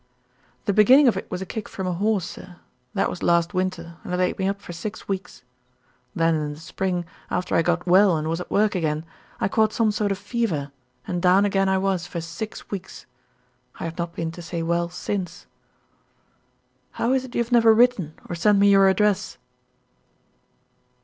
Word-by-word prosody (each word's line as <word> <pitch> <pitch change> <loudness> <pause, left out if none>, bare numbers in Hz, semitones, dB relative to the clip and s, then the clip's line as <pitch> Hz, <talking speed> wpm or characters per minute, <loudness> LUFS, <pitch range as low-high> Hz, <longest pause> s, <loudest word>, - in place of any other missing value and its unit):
"The 200 - +1
beginning 255 +8 +7
of 235 - +4
it - - -5
was 185 - -4
a - - -7
kick 215 +3 -6
from 190 - -5
a 180 - -1
horse, 200 0 0
sir. 185 -1 -10 0.4
That - - +2
was 180 - -6
last 170 +2 +2
winter, 180 -3 -3
and - - -7
it 180 - 0
laid 180 +1 0
me 190 - +1
up 200 0 -2
for 175 - -9
six 205 +6 -7
weeks. 195 -9 -5 0.7
Then, 165 0 +2
in 150 -2 -2
the - - -14
spring, 180 +1 -3 0.2
after 180 - -2
I - - +4
got 175 +1 0
well 185 -1 +5
and 155 0 -3
was 165 +2 -2
at - - -8
work 210 +1 +2
again, 155 -3 -1 0.3
I - - +1
caught 215 +2 +2
some 225 -2 +2
sort 205 -1 -1
of 195 - -1
fever, 200 - -2 0.3
and 175 -1 -3
down 185 +2 +5
again 195 -1 +1
I 190 - +2
was 190 -2 -1
for 170 - -5
six 170 +6 -7
weeks. 190 -2 -7 0.7
I - - -5
have 165 +1 -5
not 170 0 -3
been 165 -1 -3
to 175 - -10
say 170 0 -4
well 170 +1 0
since." 180 0 -4 1.5
"How 240 +3 0
is 265 -1 +1
it 260 -1 -10
you 235 - +2
have 235 - -14
never 230 -2 +6
written 220 -9 +3
or - - -5
sent 200 +5 +3
me 200 0 +5
your 195 -1 +6
address?" 205 +1 +1
185 Hz, 200 wpm, -24 LUFS, 170-205 Hz, 1.5 s, beginning